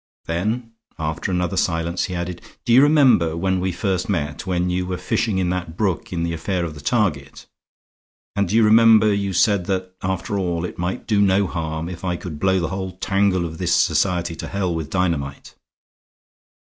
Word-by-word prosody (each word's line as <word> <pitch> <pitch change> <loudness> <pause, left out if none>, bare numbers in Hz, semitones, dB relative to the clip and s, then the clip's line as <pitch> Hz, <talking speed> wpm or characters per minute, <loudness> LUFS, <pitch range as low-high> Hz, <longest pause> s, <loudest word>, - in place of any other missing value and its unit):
Then 110 +8 -2 0.3
after 80 +2 -3
another 90 0 -1
silence 85 0 0
he 90 - -5
added: 85 0 -4 0.2
"Do 120 - +3
you 130 - +8
remember 135 - +4
when 95 +1 0
we 95 +1 -1
first 95 0 -2
met, 75 -2 -2
when 90 -1 0
you 90 0 -1
were 90 0 -3
fishing 95 +3 -1
in 90 -1 0
that 85 -2 -4
brook 100 -6 -1
in 85 -2 -2
the 85 0 -1
affair 85 +2 -2
of 80 - -5
the 75 - -11
target? 85 - -1 0.9
And 100 -1 +1
do 105 - 0
you 115 - +5
remember 110 -1 +6
you 100 -1 -1
said 95 0 +2
that, 95 -1 -2
after 95 +2 -2
all, 85 -2 -1
it - - -8
might 90 +2 -3
do 105 -3 +2
no 100 0 +3
harm 80 -2 -3
if 90 0 -8
I 90 -1 -1
could 85 -4 -7
blow 95 +1 +2
the 85 - -2
whole 95 -1 -4
tangle 95 -1 +1
of 80 -1 -7
this 90 -2 +2
society 85 -3 +1
to - - -6
hell 95 -3 -1
with 80 -2 -4
dynamite." 80 -7 -2
90 Hz, 195 wpm, -21 LUFS, 85-100 Hz, 0.9 s, you